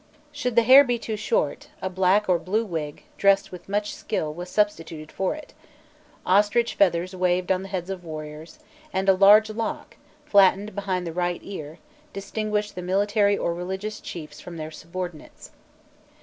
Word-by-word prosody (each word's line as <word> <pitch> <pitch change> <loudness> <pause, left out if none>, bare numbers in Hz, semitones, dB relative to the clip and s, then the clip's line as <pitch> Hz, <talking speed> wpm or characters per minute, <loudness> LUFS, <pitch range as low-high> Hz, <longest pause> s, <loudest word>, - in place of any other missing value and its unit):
Should 250 -5 -3
the 235 - +6
hair 260 +4 +9
be 245 -3 0
too 225 -1 -4
short, 475 - -1
a - - -3
black 190 +3 +2
or 180 -2 +3
blue 205 +7 -1
wig, 155 -6 -5 0.2
dressed 195 0 +3
with 180 +1 -11
much 205 +1 -1
skill, 155 -8 -3
was 175 +3 -7
substituted 165 -7 -1
for 190 +7 -1
it; 310 - -12 0.7
ostrich 210 +5 +3
feathers 185 -1 +1
waved 180 0 +1
on 185 0 +1
the 195 - -7
heads 185 -1 -4
of 185 -2 -6
warriors, 155 - -8 0.3
and 190 +1 -1
a 195 - +7
large 205 +3 +6
lock, 225 +1 -5 0.3
flattened 200 +1 +4
behind 190 -3 -2
the 165 - -5
right 175 0 -1
ear, 160 -6 -8 0.4
distinguished 210 +1 -2
the 180 - -6
military 200 +2 +2
or 170 - -1
religious 190 +5 -5
chiefs 155 -3 -8
from 175 -1 -9
their 155 0 -6
subordinates. 170 0 -8
190 Hz, 165 wpm, -25 LUFS, 175-210 Hz, 0.7 s, hair